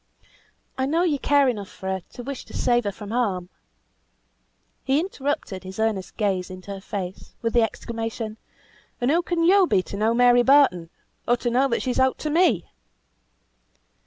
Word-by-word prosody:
"I 260 - +1
know 330 +5 +2
you 305 -6 +1
care 285 0 +3
enough 210 -6 -2
for 190 - -9
her 190 0 -1
to 245 - -8
wish 275 +1 -6
to - - -8
save 240 -2 +2
her 205 - 0
from 205 +1 -9
harm." 195 -7 -1 1.3
He 270 +2 +2
interrupted 285 - -3
his 190 0 -9
earnest 220 -4 -2
gaze 195 -4 0
into 185 +2 -9
her 195 -1 -6
face, 190 -2 -6
with 230 -1 0
the 240 - +5
exclamation 225 0 -3 0.6
"And 245 +2 +1
who 335 +3 +3
can 345 -1 -1
yo 375 +2 +5
be 185 - +2
to 200 - -7
know 220 +3 +2
Mary 245 0 +5
Barton, 245 - +4 0.4
or 240 - +3
to 240 0 -2
know 260 +3 +3
that 235 - -1
she's 255 0 -1
ought 260 0 +3
to 305 - -3
me?" 350 +4 +2
235 Hz, 180 wpm, -24 LUFS, 200-275 Hz, 1.3 s, the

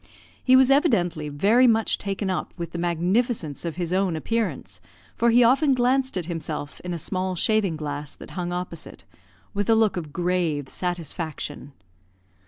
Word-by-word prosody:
He 255 - +6
was 260 0 +6
evidently 175 - +2
very 210 - +4
much 225 -2 +2
taken 195 -1 -2
up 185 - -3
with 170 -2 -5
the 170 - -5
magnificence 175 - 0
of 170 -2 -4
his 175 0 -3
own 190 -2 +1
appearance, 155 - -3 0.3
for 235 - +3
he 240 +1 +6
often 270 +4 +4
glanced 255 -1 +1
at 175 - -2
himself 155 -3 -5
in 180 - -6
a 170 - -2
small 185 +3 -2
shaving 200 -2 +1
glass 145 -1 -5
that - - -12
hung 175 -2 -3
opposite, 175 -2 -6 0.5
with 205 +1 -1
a 225 - +6
look 220 -4 +2
of 155 -4 -5
grave 170 -5 -1
satisfaction. 165 -5 -5
180 Hz, 165 wpm, -24 LUFS, 160-225 Hz, 0.5 s, He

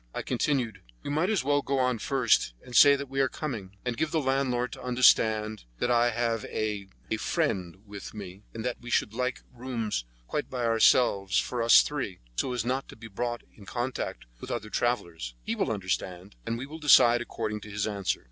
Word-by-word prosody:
I - - -3
continued: 120 -9 -1 0.2
"You - - -4
might 160 +6 +1
as 215 -10 +1
well 145 +1 +2
go 140 0 -1
on 125 -3 +1
first, 120 - +2
and 125 - -9
say 140 0 +8
that 140 0 -5
we 135 +1 -3
are 135 -1 +3
coming; 105 -12 -6
and 125 -1 -1
give 160 +6 0
the 160 - +1
landlord 130 -3 0
to - - -9
understand 110 - +3
that 120 - 0
I 120 0 +4
have 115 -1 -1
a—a 105 0 -4
friend 95 - -1
with 100 -1 -8
me 95 -2 -8
and 115 0 -6
that 125 - -3
we 120 - -9
should 105 - +1
like 125 -3 -2
rooms 115 - -3 0.2
quite - - -3
by 125 -2 -3
themselves 115 -3 +4
for 125 -1 0
us 115 0 +7
three, 130 -11 -4 0.2
so 130 - -1
as 120 -3 -2
not 130 +2 -1
to - - -10
be 115 0 -11
brought 120 +3 -3
in 100 -3 -15
contact 120 - -3
with - - -8
other 105 -3 -4
travellers. 85 - -2
He - - -2
will - - 0
understand, 95 -1 -3
and 115 - -1
we 125 - -5
will 155 +3 -9
decide 120 -5 +6
according 110 -2 -4
to 105 - -10
his 105 -1 -2
answer." 100 -3 -1
120 Hz, 205 wpm, -28 LUFS, 105-130 Hz, 0.2 s, say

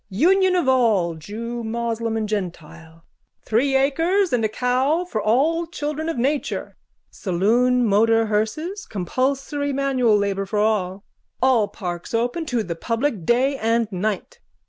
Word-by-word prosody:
Union 365 - +3
of 350 -7 +1
all, 220 -10 +3
jew, 230 +9 -6
moslem 230 0 -2
and 215 -1 -2
gentile. 165 -5 -6 0.4
Three 270 +5 +1
acres 330 +8 +2
and 240 -2 +2
a 220 - +1
cow 260 +9 +1
for 220 -12 -3
all 305 +11 +2
children 305 0 -4
of 330 - -3
nature. 275 +4 -2 0.4
Saloon 235 +7 +1
motor 225 +2 +3
hearses. 265 - -2
Compulsory 270 - -2
manual 265 -5 +2
labour 195 -1 -1
for 210 - -3
all. 205 -2 0 0.3
All 250 -5 +3
parks 175 +1 -5
open 245 +8 -1
to 240 -5 0
the 170 -3 -4
public 230 - -2
day 265 +3 +2
and 230 -1 0
night. 210 - -3
235 Hz, 140 wpm, -22 LUFS, 210-275 Hz, 0.4 s, Union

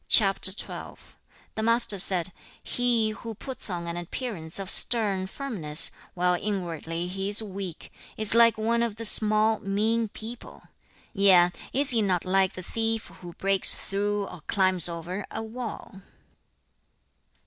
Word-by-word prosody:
The 195 +1 -1
Master 230 -3 +3
said, 185 -1 -1 0.3
'He 235 -3 0
who 225 +1 -8
puts 260 +1 -7
on 175 -2 -5
an 170 0 -5
appearance 175 -2 -3
of 195 -1 -3
stern 200 -5 +3
firmness, 190 - +2 0.2
while 180 0 +1
inwardly 175 -3 -4
he 195 +2 -4
is 210 +2 +4
weak, 195 -4 -8 0.2
is 215 -1 +6
like 230 -1 +5
one 230 +2 0
of 235 -3 -2
the 230 +1 -7
small, 215 0 +3
mean 220 +3 -1
people; 225 +3 -10 0.5
yea, 185 -3 +5 0.2
is 275 +1 +1
he 230 -2 +2
not 185 -4 -1
like 190 0 +1
the 185 - -9
thief 225 +3 -3
who 175 -1 -10
breaks 195 +1 +4
through, 205 +1 -2
or 180 - -11
climbs 185 -3 +3
over, 170 +4 -6
a 225 - -6
wall?' 220 -4 -8
200 Hz, 135 wpm, -26 LUFS, 185-225 Hz, 0.5 s, is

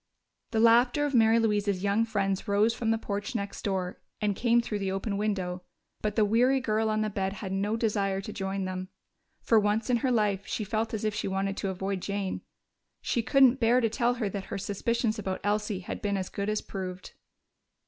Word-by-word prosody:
The 225 - 0
laughter 240 +5 +5
of 285 - -2
Mary 225 -1 +5
Louise's 205 -4 +1
young 205 +3 +2
friends 195 -3 -1
rose 205 +3 +3
from 230 -1 -2
the 225 - +3
porch 205 +3 -4
next 200 -2 -3
door 185 -3 -2 0.2
and 205 -2 0
came 235 +2 +3
through 220 -3 -2
the 195 -1 -1
open 195 +2 -2
window, 190 -3 -2 0.4
but 210 -1 -1
the 215 - +4
weary 245 +6 +3
girl 220 -3 0
on 215 0 +1
the 215 - 0
bed 195 -1 -1
had 195 -1 -6
no 205 +3 0
desire 200 -4 0
to 200 +2 -6
join 195 0 -3
them. 185 0 -4 0.5
For 225 - +5
once 215 +3 +1
in 240 - +4
her 255 +3 0
life 205 -5 +1
she 215 - -2
felt 220 +2 -1
as 215 - -3
if 215 - 0
she 210 - -2
wanted 195 0 -1
to 195 - -2
avoid 190 0 -3
Jane. 200 -1 -3 0.6
She 235 - 0
couldn't 265 +1 +5
bear 240 +1 +4
to 230 -2 +1
tell 240 +2 +1
her 230 -4 -1
that 195 0 -4
her - - -5
suspicions 215 +3 -1
about 190 -2 -3
Elsie 205 -1 -1
had - - -6
been 200 -1 0
as 185 -1 -3
good 200 +1 -3
as 215 0 0
proved. 185 -2 -6
210 Hz, 210 wpm, -28 LUFS, 195-225 Hz, 0.6 s, laughter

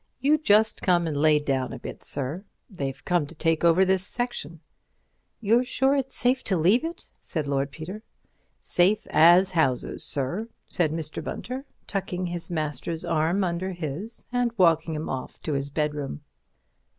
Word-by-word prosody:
You 295 +4 +3
just 220 -5 +3
come 175 -2 +2
and 155 -3 -2
lay 150 +1 +4
down 135 -3 -1
a - - -6
bit, - - -9
sir—they've 140 - -5
come 175 -5 +1
to 165 - -12
take 165 +1 0
over 170 +3 +5
this 190 0 +3
section." 185 -8 -2 0.8
"You're 230 +3 +3
sure 265 +2 +1
it's 270 -2 -1
safe 255 +2 +3
to 190 - +1
leave 190 - +3
it?" 330 +1 -6
said 155 -4 -2
Lord 140 0 0
Peter. 160 +9 -8 0.6
"Safe 195 +5 +3
as 175 +4 +6
houses, 135 -8 +1
sir," 150 - -1 0.2
said 165 -4 0
Mr. 160 -1 -2
Bunter, 260 +3 -5 0.2
tucking 185 -2 -3
his 175 0 -3
master's 160 0 -3
arm 165 +5 +1
under 185 +1 -2
his 175 +7 -5
and 245 -1 +1
walking 165 -3 +3
him 155 - -4
off 130 -1 -5
to 155 - -2
his 140 0 -2
bedroom. 150 - -3
170 Hz, 160 wpm, -26 LUFS, 150-205 Hz, 0.8 s, as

